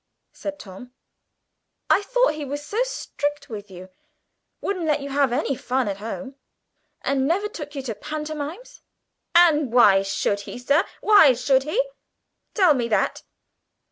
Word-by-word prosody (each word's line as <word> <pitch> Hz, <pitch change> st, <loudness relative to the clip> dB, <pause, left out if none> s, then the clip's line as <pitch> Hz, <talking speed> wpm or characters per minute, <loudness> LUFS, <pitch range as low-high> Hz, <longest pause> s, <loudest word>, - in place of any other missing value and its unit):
said 295 Hz, -1 st, -6 dB
Tom. 225 Hz, +1 st, -11 dB, 1.0 s
"I -, -, +4 dB
thought -, -, +2 dB
he 305 Hz, -1 st, -6 dB
was 290 Hz, +1 st, -5 dB
so 430 Hz, +9 st, -1 dB
strict 295 Hz, -12 st, -3 dB
with 210 Hz, -2 st, -7 dB
you. 185 Hz, 0 st, -11 dB, 0.7 s
Wouldn't 365 Hz, -5 st, -3 dB
let 300 Hz, -1 st, +2 dB
you 280 Hz, -, -6 dB
have 275 Hz, -2 st, +2 dB
any 275 Hz, +2 st, 0 dB
fun 255 Hz, 0 st, -1 dB
at 195 Hz, -1 st, -3 dB
home, 230 Hz, +6 st, -6 dB, 0.7 s
and 270 Hz, -1 st, +1 dB
never 385 Hz, +6 st, +1 dB
took 295 Hz, -7 st, -9 dB
you 275 Hz, -, -4 dB
to 240 Hz, -4 st, -3 dB
pantomimes?" 305 Hz, -, -6 dB, 0.5 s
"And 310 Hz, -7 st, +5 dB
why 210 Hz, -6 st, +6 dB
should 195 Hz, +1 st, -1 dB
he, -, -, -7 dB
sir, 280 Hz, +7 st, +2 dB, 0.2 s
why 405 Hz, -11 st, +7 dB
should 260 Hz, +2 st, +2 dB
he? 315 Hz, +11 st, -1 dB, 0.8 s
Tell 370 Hz, -7 st, +5 dB
me 245 Hz, -4 st, -1 dB
that. 220 Hz, -, 0 dB
285 Hz, 150 wpm, -23 LUFS, 245-310 Hz, 1.0 s, why